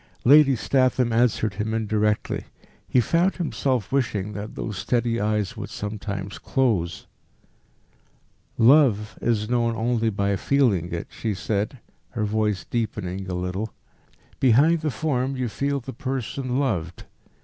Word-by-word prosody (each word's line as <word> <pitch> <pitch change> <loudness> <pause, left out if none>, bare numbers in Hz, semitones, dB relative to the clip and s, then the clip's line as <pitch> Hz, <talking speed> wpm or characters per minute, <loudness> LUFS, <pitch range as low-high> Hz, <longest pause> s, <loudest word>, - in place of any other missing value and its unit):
Lady 140 +1 +7
Statham 130 -1 +1
answered 115 -3 +2
him 110 +2 -2
indirectly. 105 -1 0 0.4
He 125 - +3
found 170 - +2
himself 135 - -1
wishing 105 -7 -1
that 105 +2 -6
those 105 -3 -4
steady 115 +3 0
eyes 105 +1 0
would 105 -3 -6
sometimes 100 -1 -5
close. 95 -10 0 1.5
"Love 115 -4 +4
is 110 -3 0
known 120 -1 +1
only 115 0 +1
by 100 -1 0
feeling 105 - +1
it," 85 - -3
she 110 -3 -3
said, 105 +7 -2 0.4
her 105 - +1
voice 105 -2 0
deepening 95 -5 -3
a 90 - -2
little. 90 +4 -3 0.6
"Behind 145 +7 +4
the 155 - 0
form 135 0 -1
you 125 -1 -1
feel 140 +5 -1
the 130 +1 -8
person 130 -1 -3
loved. 90 - -2
115 Hz, 130 wpm, -24 LUFS, 105-130 Hz, 1.5 s, Lady